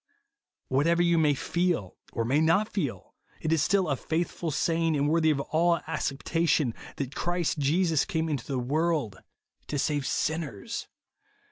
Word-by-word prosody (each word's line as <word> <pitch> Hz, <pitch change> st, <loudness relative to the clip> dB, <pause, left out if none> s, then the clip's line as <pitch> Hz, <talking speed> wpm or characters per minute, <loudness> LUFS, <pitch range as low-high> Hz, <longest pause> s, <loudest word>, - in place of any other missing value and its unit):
What 135 Hz, +4 st, +2 dB
ever 170 Hz, +1 st, +3 dB
you 170 Hz, -1 st, +3 dB
may 150 Hz, -2 st, +3 dB
feel, 170 Hz, -, -1 dB, 0.2 s
or 115 Hz, -, -2 dB
may 140 Hz, +6 st, +2 dB
not 165 Hz, +7 st, +3 dB
feel, 140 Hz, -, -3 dB, 0.3 s
it 155 Hz, -, 0 dB
is 160 Hz, -, +2 dB
still 190 Hz, +2 st, +2 dB
a 140 Hz, -, +1 dB
faithful 165 Hz, +4 st, -2 dB
saying, 165 Hz, +1 st, +1 dB
and 145 Hz, +1 st, +1 dB
worthy 160 Hz, +1 st, +3 dB
of 150 Hz, -3 st, +2 dB
all 170 Hz, +4 st, +2 dB
iicceptation, 150 Hz, -2 st, 0 dB, 0.2 s
that 140 Hz, -1 st, -4 dB
Christ 175 Hz, -2 st, -1 dB
Jesus 160 Hz, +2 st, +2 dB
came 165 Hz, -5 st, -1 dB
into 145 Hz, -6 st, -3 dB
the 135 Hz, -, -2 dB
world 145 Hz, -, 0 dB, 0.5 s
to 145 Hz, -, -2 dB
save 145 Hz, -1 st, 0 dB
sinners. 155 Hz, -11 st, -2 dB
160 Hz, 155 wpm, -28 LUFS, 140-170 Hz, 0.5 s, ever